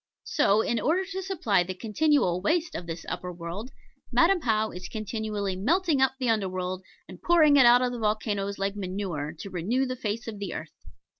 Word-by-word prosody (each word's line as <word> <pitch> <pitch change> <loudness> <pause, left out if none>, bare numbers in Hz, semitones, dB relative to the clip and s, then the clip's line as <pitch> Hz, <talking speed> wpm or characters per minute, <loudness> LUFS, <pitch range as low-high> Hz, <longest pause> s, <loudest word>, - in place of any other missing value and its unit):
So, 220 -8 +3
in 230 +1 0
order 355 +9 +1
to 380 0 -5
supply 315 - +1
the 185 +1 -4
continual 220 - +1
waste 320 - 0
of 170 - -6
this 165 0 -6
upper 180 - -4
world, 175 +7 -6 0.4
Madam 355 +1 +4
How 220 -4 +1
is 180 0 -7
continually 215 -2 -3
melting 305 - +1
up 265 0 +4
the 255 - -1
under 215 -4 +1
world, 185 0 -3 0.3
and - - -12
pouring 315 -4 +5
it 265 -4 +7
out 245 +1 +6
of 250 - 0
the 245 - -5
volcanos 210 -2 -1
like 195 +1 -2
manure, 185 -6 -3
to 195 - -8
renew 215 +10 0
the 255 0 -3
face 230 -1 -4
of 215 -3 -6
the 200 -4 -4
earth. 155 0 -7
215 Hz, 200 wpm, -27 LUFS, 185-265 Hz, 0.4 s, it